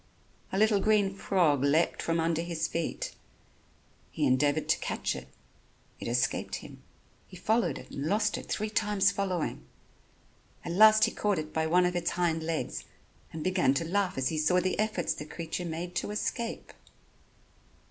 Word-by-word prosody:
A 190 Hz, -, -1 dB
little 215 Hz, 0 st, +4 dB
green 205 Hz, -1 st, +2 dB
frog 170 Hz, -8 st, +2 dB
leapt 155 Hz, +4 st, +2 dB
from 165 Hz, 0 st, 0 dB
under 165 Hz, 0 st, +1 dB
his 165 Hz, -2 st, -2 dB
feet. 165 Hz, -1 st, -3 dB, 1.0 s
He -, -, -1 dB
endeavored 145 Hz, +4 st, +2 dB
to -, -, +3 dB
catch -, -, -2 dB
it. -, -, -8 dB, 0.7 s
It -, -, -5 dB
escaped 120 Hz, 0 st, 0 dB
him. -, -, -10 dB, 0.5 s
He 185 Hz, -, -12 dB
followed 220 Hz, +6 st, +1 dB
it -, -, -12 dB
and 140 Hz, +2 st, -3 dB
lost 210 Hz, +3 st, +1 dB
it -, -, -7 dB
three 215 Hz, 0 st, -2 dB
times 205 Hz, -2 st, +2 dB
following. 185 Hz, -5 st, -2 dB, 1.0 s
At -, -, -3 dB
last 215 Hz, +4 st, +7 dB
he -, -, +4 dB
caught 205 Hz, -2 st, 0 dB
it 155 Hz, 0 st, -5 dB
by 160 Hz, 0 st, 0 dB
one 180 Hz, +2 st, +4 dB
of 180 Hz, 0 st, 0 dB
its 175 Hz, -, 0 dB
hind 170 Hz, -2 st, 0 dB
legs 155 Hz, -, -3 dB, 0.5 s
and 160 Hz, -1 st, -6 dB
began 185 Hz, -7 st, +2 dB
to 165 Hz, -, 0 dB
laugh 190 Hz, 0 st, 0 dB
as 130 Hz, -1 st, +1 dB
he 155 Hz, -, -2 dB
saw 180 Hz, +4 st, +3 dB
the 185 Hz, +2 st, -1 dB
efforts 215 Hz, -5 st, 0 dB
the -, -, -7 dB
creature 165 Hz, +3 st, -5 dB
made 170 Hz, +2 st, -4 dB
to -, -, -2 dB
escape. 230 Hz, +2 st, -3 dB
175 Hz, 170 wpm, -29 LUFS, 160-200 Hz, 1.0 s, last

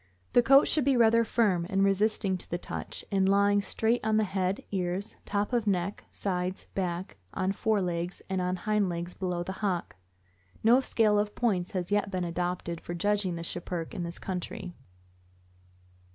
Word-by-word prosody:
The -, -, +7 dB
coat 275 Hz, +4 st, +6 dB
should 305 Hz, -, +2 dB
be 270 Hz, -1 st, +3 dB
rather 230 Hz, 0 st, +5 dB
firm 205 Hz, -7 st, +1 dB
and 195 Hz, -1 st, +2 dB
resisting 195 Hz, 0 st, +2 dB
to -, -, -11 dB
the 175 Hz, -, -1 dB
touch, -, -, -6 dB
and 195 Hz, -1 st, +3 dB
lying 200 Hz, +1 st, +4 dB
straight 225 Hz, +4 st, 0 dB
on 215 Hz, 0 st, +2 dB
head, 195 Hz, -2 st, 0 dB
ears, 185 Hz, +1 st, -2 dB
top 205 Hz, +3 st, -1 dB
of 235 Hz, -3 st, +1 dB
neck, 195 Hz, 0 st, -1 dB
sides, 185 Hz, -1 st, -3 dB
back, 175 Hz, -, -3 dB, 0.2 s
on 185 Hz, +1 st, +1 dB
fore 210 Hz, 0 st, +1 dB
legs, 175 Hz, 0 st, -3 dB
and 190 Hz, -1 st, -1 dB
on 180 Hz, 0 st, 0 dB
hind 210 Hz, +1 st, +1 dB
legs 175 Hz, +1 st, -4 dB
below 180 Hz, -2 st, -2 dB
the 190 Hz, -, -5 dB
hock. 185 Hz, -, -1 dB, 0.7 s
No 235 Hz, +3 st, +6 dB
scale 215 Hz, -5 st, +3 dB
of 210 Hz, 0 st, -1 dB
points 190 Hz, -7 st, 0 dB
has 180 Hz, 0 st, -3 dB
yet 205 Hz, 0 st, +2 dB
been 185 Hz, -2 st, -2 dB
adopted 175 Hz, -1 st, -3 dB
for 175 Hz, -, -5 dB
judging 200 Hz, 0 st, +1 dB
the 170 Hz, -, -5 dB
Schipperke 170 Hz, -1 st, -4 dB
in -, -, -4 dB
this 170 Hz, 0 st, -5 dB
country. 180 Hz, -1 st, -5 dB
195 Hz, 175 wpm, -29 LUFS, 180-210 Hz, 0.7 s, The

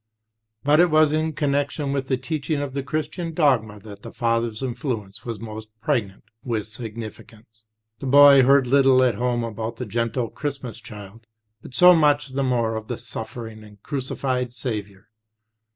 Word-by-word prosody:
But 150 Hz, +2 st, +4 dB
it 175 Hz, 0 st, +5 dB
was 155 Hz, -1 st, +4 dB
in 155 Hz, +1 st, 0 dB
connection 140 Hz, -1 st, -1 dB
with 135 Hz, -1 st, -2 dB
the 130 Hz, -, +1 dB
teaching 150 Hz, +2 st, -3 dB
of 145 Hz, -2 st, -4 dB
the 140 Hz, -, -2 dB
Christian 160 Hz, +3 st, -4 dB
dogma 115 Hz, -10 st, +2 dB
that 100 Hz, -1 st, -11 dB
the -, -, -9 dB
father's 115 Hz, 0 st, -1 dB
influence 115 Hz, -6 st, -4 dB
was 115 Hz, -4 st, -5 dB
most 110 Hz, 0 st, -8 dB
pregnant 110 Hz, -5 st, -2 dB, 0.2 s
with 115 Hz, -4 st, -2 dB
significance. 110 Hz, 0 st, -9 dB, 0.3 s
The 135 Hz, -, -5 dB
boy 140 Hz, 0 st, +8 dB
heard 135 Hz, +1 st, +5 dB
little 135 Hz, 0 st, +4 dB
at 125 Hz, -2 st, +3 dB
home 120 Hz, +2 st, -1 dB
about 115 Hz, 0 st, -4 dB
the 125 Hz, -, -5 dB
gentle 115 Hz, +2 st, -2 dB
Christmas 140 Hz, -6 st, -5 dB
Child, 105 Hz, +2 st, -12 dB, 0.3 s
but 125 Hz, -, -11 dB
so 180 Hz, 0 st, +8 dB
much 145 Hz, -2 st, +3 dB
the 135 Hz, +1 st, -2 dB
more 120 Hz, -4 st, 0 dB
of 110 Hz, 0 st, -7 dB
the 120 Hz, -, -4 dB
suffering 115 Hz, -1 st, -7 dB
and 105 Hz, -1 st, -16 dB
crucified 130 Hz, -3 st, -3 dB
Saviour. 105 Hz, -6 st, -5 dB
125 Hz, 165 wpm, -23 LUFS, 110-140 Hz, 0.3 s, boy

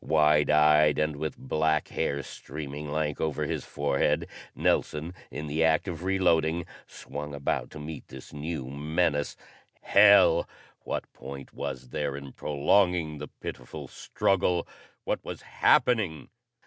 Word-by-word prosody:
Wide 75 Hz, -1 st, +4 dB
eyed, 75 Hz, 0 st, +5 dB
and 75 Hz, -1 st, 0 dB
with 80 Hz, -, -4 dB
black 80 Hz, -11 st, 0 dB
hair 70 Hz, 0 st, -1 dB
streaming 75 Hz, +2 st, -7 dB
lank 75 Hz, -1 st, -1 dB
over 75 Hz, -1 st, -1 dB
his -, -, -3 dB
forehead, 70 Hz, -1 st, 0 dB, 0.3 s
Nelson, 80 Hz, +4 st, 0 dB, 0.2 s
in 75 Hz, -, -5 dB
the 75 Hz, +2 st, 0 dB
act 80 Hz, +3 st, +3 dB
of 85 Hz, -2 st, -5 dB
reloading, 85 Hz, -3 st, +2 dB, 0.2 s
swung 75 Hz, +1 st, -7 dB
about 70 Hz, 0 st, -1 dB
to 75 Hz, -, -10 dB
meet 75 Hz, 0 st, -7 dB
this 65 Hz, +1 st, -11 dB
new 75 Hz, -1 st, -4 dB
menace. 75 Hz, +1 st, -1 dB, 0.4 s
Hell! 100 Hz, -4 st, +6 dB, 0.3 s
What -, -, -5 dB
point 70 Hz, 0 st, -9 dB
was 65 Hz, -1 st, -5 dB
there 70 Hz, +1 st, -2 dB
in 70 Hz, -2 st, -9 dB
prolonging 80 Hz, +1 st, +1 dB
the 75 Hz, -, -6 dB
pitiful -, -, -8 dB
struggle? 90 Hz, -3 st, 0 dB, 0.4 s
What -, -, -2 dB
was -, -, -7 dB
happening? 100 Hz, -, +2 dB
75 Hz, 135 wpm, -28 LUFS, 75-80 Hz, 0.4 s, Hell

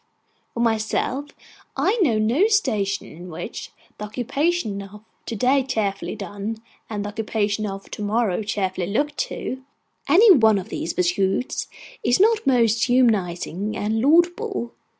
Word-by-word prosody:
For 235 Hz, -, -1 dB
myself, 235 Hz, +5 st, 0 dB, 0.5 s
I 445 Hz, +5 st, +1 dB
know 245 Hz, -11 st, +3 dB
no 235 Hz, -, +3 dB
station 210 Hz, -, 0 dB
in 175 Hz, +3 st, -11 dB
which, 160 Hz, -, -7 dB, 0.3 s
the 210 Hz, -, -4 dB
occupation 245 Hz, -, -1 dB
of 200 Hz, +2 st, -11 dB, 0.2 s
to 230 Hz, -, -3 dB
day 255 Hz, +6 st, +3 dB
cheerfully 205 Hz, -6 st, -2 dB
done 205 Hz, +2 st, -5 dB, 0.3 s
and 205 Hz, -2 st, -3 dB
the -, -, -3 dB
occupation 210 Hz, 0 st, -1 dB
of 195 Hz, 0 st, -7 dB
to -, -, -6 dB
morrow 210 Hz, -2 st, 0 dB
cheerfully 190 Hz, -4 st, -2 dB
looked 290 Hz, +9 st, -1 dB
to, 260 Hz, -, -5 dB, 0.5 s
any 420 Hz, +5 st, +7 dB
one 220 Hz, -, +6 dB
of 190 Hz, -, -5 dB
these 170 Hz, -, -4 dB
pursuits 190 Hz, +6 st, 0 dB, 0.4 s
is 245 Hz, -, +3 dB
not 435 Hz, -4 st, +3 dB
most 230 Hz, -4 st, +3 dB
humanising 210 Hz, -5 st, +1 dB
and 220 Hz, +2 st, -1 dB
laudable. 345 Hz, -, +2 dB
220 Hz, 140 wpm, -23 LUFS, 200-265 Hz, 0.5 s, any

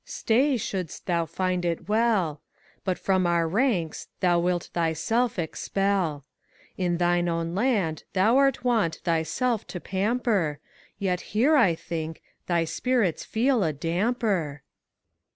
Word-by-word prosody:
Stay, 260 Hz, +4 st, +1 dB
shouldst 185 Hz, -6 st, -4 dB
tliou 170 Hz, -3 st, 0 dB
find 180 Hz, +1 st, -1 dB
it 170 Hz, -1 st, -2 dB
well; 210 Hz, -9 st, +1 dB, 0.4 s
But 185 Hz, -2 st, -1 dB
from 190 Hz, -2 st, +1 dB
our 170 Hz, -1 st, +2 dB
ranks 185 Hz, -, 0 dB
thou 175 Hz, -2 st, +3 dB
wilt 175 Hz, 0 st, -1 dB
thyself 175 Hz, +9 st, 0 dB
expel. 175 Hz, -2 st, -1 dB, 0.5 s
In 175 Hz, -2 st, 0 dB
thine 175 Hz, 0 st, +2 dB
own 165 Hz, 0 st, -2 dB
land 195 Hz, -7 st, 0 dB
thou 215 Hz, +7 st, +4 dB
'rt 275 Hz, -2 st, +2 dB
wont 225 Hz, -10 st, +2 dB
thyself 180 Hz, +8 st, 0 dB
to 180 Hz, -, -6 dB
pamper, 195 Hz, -5 st, 0 dB, 0.4 s
Tet 180 Hz, -3 st, 0 dB, 0.2 s
here, 285 Hz, +8 st, +5 dB
I 200 Hz, -, +4 dB
think, 160 Hz, -1 st, -5 dB, 0.2 s
thy 170 Hz, -2 st, +2 dB
spirits 200 Hz, +2 st, 0 dB
feel 240 Hz, 0 st, +1 dB
a 160 Hz, -, +1 dB
damper. 170 Hz, -, -1 dB
185 Hz, 130 wpm, -26 LUFS, 165-225 Hz, 0.5 s, here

